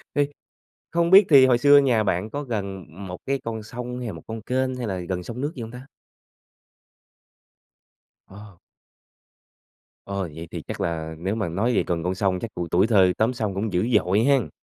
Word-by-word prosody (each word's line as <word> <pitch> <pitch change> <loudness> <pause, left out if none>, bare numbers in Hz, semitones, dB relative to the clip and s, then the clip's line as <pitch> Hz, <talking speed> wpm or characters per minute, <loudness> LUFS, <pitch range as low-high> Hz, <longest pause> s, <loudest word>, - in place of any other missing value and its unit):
Thì 145 -1 +2 0.7
không 170 +1 +1
biết 195 +1 +8
thì 135 -3 +8
hồi 125 -2 +4
xưa 145 +2 +7
nhà 125 -6 +3
bạn 95 +2 -1
có 145 +5 -4
gần 100 -6 -4 0.2
một 90 0 -6
cái 135 0 -1
con 110 -1 -4
sông 125 +2 -6
hay 125 - -5
là - - -4
một 80 -3 -10
con 110 0 -6
kênh, 130 +3 -1
hay 125 -2 -4
là 95 -3 -3
gần 90 +1 -4
sông 120 +7 -7
nước 145 +2 -2
gì 125 - -7
hông 110 - -7
ta? 125 +2 -10 2.4
Ồ. 100 -2 -13 1.5
Ồ! 100 -2 -3
Vậy 80 +1 -8
thì - - -6
chắc - - -7
là 80 -1 -3
nếu 95 +5 -2
mà 110 -5 -2
nói 110 +9 0
về - - +2
gần 85 -2 -1
con 90 +1 0
sông 95 -1 0
chắc 115 - -5
tuổi 85 -1 -4
tuổi 95 +4 +3
thơ 95 -5 +4
tắm 115 +4 +2
sông 105 -5 -2
cũng 100 +2 -2
dữ 90 +7 +1
dội 100 0 +3
hén. 135 0 +2
110 Hz, 205 wpm, -24 LUFS, 95-125 Hz, 2.4 s, biết